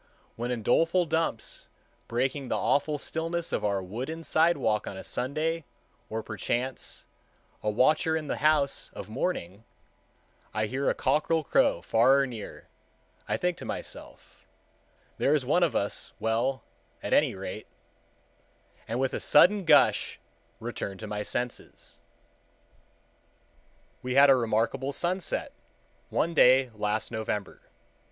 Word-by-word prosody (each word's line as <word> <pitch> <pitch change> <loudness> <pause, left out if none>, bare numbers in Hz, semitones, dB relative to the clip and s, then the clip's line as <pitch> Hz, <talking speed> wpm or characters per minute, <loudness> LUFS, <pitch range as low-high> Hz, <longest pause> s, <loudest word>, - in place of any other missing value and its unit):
When, 120 +2 -3
in 120 -3 -3
doleful 165 - +3
dumps, 160 -8 -2 0.4
breaking 130 +3 -1
the - - 0
awful 150 +1 +1
stillness 165 +3 -2
of - - -1
our 100 -2 0
wooden 130 - -5
sidewalk 155 -11 +2
on 95 - -6
a - - -7
Sunday, 155 +6 -2 0.5
or, 110 0 -3
perchance, 120 +5 -3 0.6
a 105 - 0
watcher 155 +8 +3
in 155 - -5
the - - -3
house 150 -2 +2
of - - -8
mourning, 110 - -3 0.9
I 110 0 +1
hear 130 +5 -1
a - - 0
cockerel 155 +4 +1
crow - - +2
far 115 +4 +4
or 140 - +3
near, 115 -5 -8 0.6
I - - +1
think 180 -1 -1
to - - -8
myself, - - -8 0.7
"There 145 - +3
is 140 -4 0
one 150 +7 +2
of 170 -4 +2
us 100 - -1
well, 115 +3 0 0.4
at - - -1
any - - +3
rate,"—and 115 +3 -11
with 135 0 0
a - - -2
sudden 195 +5 +5
gush 150 -3 +4 0.4
return 115 -4 -5
to 110 - -7
my 105 0 -4
senses. 120 +3 -5 2.0
We 125 0 -3
had 140 0 +8
a - - +7
remarkable 120 +4 0
sunset 180 +3 -2 0.6
one 170 +2 0
day 130 -3 +5
last 105 +1 -2
November. 110 -3 -4
130 Hz, 130 wpm, -28 LUFS, 110-155 Hz, 2.0 s, had